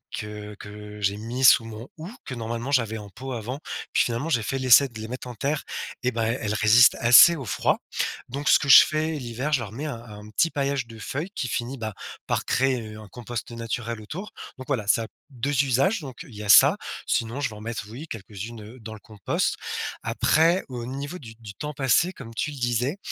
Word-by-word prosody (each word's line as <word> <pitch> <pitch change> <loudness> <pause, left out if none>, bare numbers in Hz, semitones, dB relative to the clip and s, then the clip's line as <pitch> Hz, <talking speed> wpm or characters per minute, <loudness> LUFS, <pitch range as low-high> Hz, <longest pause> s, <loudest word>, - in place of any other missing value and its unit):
que 105 0 -7
que 105 0 -10
j'ai 100 0 +1
mis 120 +5 -4
sous 115 -2 +7
mon 115 +2 -8
houx, 165 +7 -8
que, 130 - -5
normalement, 120 +3 -4
j'avais 115 -5 +1
en 105 -1 -10
pot, 130 +7 -8
avant. 120 +4 -5 0.3
Puis, - - +4
finalement, 120 +7 -2
j'ai 120 -8 +1
fait 135 +5 -2
l'essai 130 +2 +7
de 115 -4 -11
les 110 - -6
mettre 125 +3 -6
en 125 - -6
terre 140 +6 -2 0.4
et 125 - +1
ben, 115 -1 -3
elles 115 +3 0
elles 105 -2 -1
résistent 110 +3 +6
assez 125 +8 +8
au 140 -5 -6
froid. 105 - 0 0.5
Donc 140 +4 -4
ce - - +7
que 140 - -3
je 125 - +11
fais, 155 +1 -1
l'hiver, 130 +1 -3
je 140 - +4
leur 110 -4 -6
mets 135 +7 -6
un 120 -6 -5
un 105 -2 -11
petit 165 +10 +1
paillage 140 -3 -1
de 115 -1 -12
feuilles 145 - -4
qui 130 - -3
finit, 120 +3 -3
ben, 110 -1 -4 0.3
par - - -1
créer, 130 -1 +1
heu, - - -10
un 110 - -11
compost 120 +1 -6
naturel 115 0 -4
autour. 175 - -7 0.3
Donc 130 - -9
voilà, 125 -7 -1
ça 115 +2 +3
a - - -10 0.2
2 140 +2 0
usages. 140 - +2
Donc 130 -5 -9
il 130 -11 -14
y 105 - -7
a 105 - -6
ça. - - +8 0.3
Sinon, 115 +4 -1
je - - 0
vais 110 - -10
en 105 - -11
mettre, 115 -1 -5
oui, 130 +9 -8
quelques-unes, 110 0 -8
heu, 110 +5 -12
dans 110 0 -8
le 110 - -10
compost. 105 -1 -2 0.5
Après, 165 +4 +3
au 120 -2 -5
niveau 140 +7 -5
du 115 -9 -11
du 110 -3 -10
temps 150 0 -5
passé, 145 +6 +2
comme 115 -9 -10
tu 150 - -2
le 145 - -9
disais, 125 - 0
120 Hz, 230 wpm, -25 LUFS, 110-140 Hz, 0.5 s, je